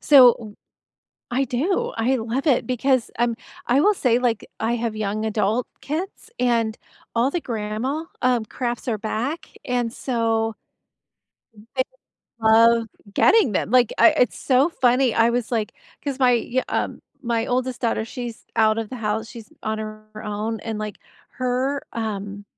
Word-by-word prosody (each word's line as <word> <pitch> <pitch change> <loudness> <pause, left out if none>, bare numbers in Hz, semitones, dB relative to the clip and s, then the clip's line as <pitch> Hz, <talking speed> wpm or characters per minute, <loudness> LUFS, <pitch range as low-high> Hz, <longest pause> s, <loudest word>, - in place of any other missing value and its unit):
So, 260 -5 +8
w 215 -3 -11 0.8
I 270 +2 +2
do. 280 +10 0
I 250 +4 +2
love 240 +4 -2
it 265 -5 +3
because, 255 0 +1
um, 235 -1 +2 0.3
I 250 +3 +4
will 420 +6 +5
say, 245 - +2
like, 235 -4 0
I 225 +2 0
have 230 -2 -2
young 215 0 -2
adult 220 +2 +1 0.2
kids, 350 +9 -5
and 230 -3 +1 0.4
all 240 +4 +3
the 350 - 0
grandma, 230 +6 -3 0.2
um, 250 -3 +2
crafts 240 +3 -4
are 220 - 0
back 230 - -3 0.2
and 245 -2 0
so 225 -3 0 1.2
they 260 - +4 0.6
love 230 +1 +6 0.3
getting 405 - +5
them. 190 - -1
Like, 245 -2 +4
I - - +8
it's 275 -6 +1
so 265 +4 +3
funny. 250 -4 +3
I 230 +1 +4
was 240 -1 -1
like 220 -2 0 0.3
'cause 280 -2 -2
my 255 -2 +5 0.2
y 260 - +3
um, - - -2 0.2
my 230 -1 0
oldest 255 0 -1
daughter, 230 -2 0
she's 235 0 -7
out 215 -1 +4
of 225 -2 -4
the 255 - -5
house, 220 -1 -2
she's 230 -3 -11
on 215 0 -2
her 215 0 -7 0.2
own, 210 +1 -3
and, 225 -2 -4
like, 215 -1 -5 0.4
her, 255 +3 0
um, 205 -2 -4
235 Hz, 160 wpm, -23 LUFS, 220-255 Hz, 1.2 s, So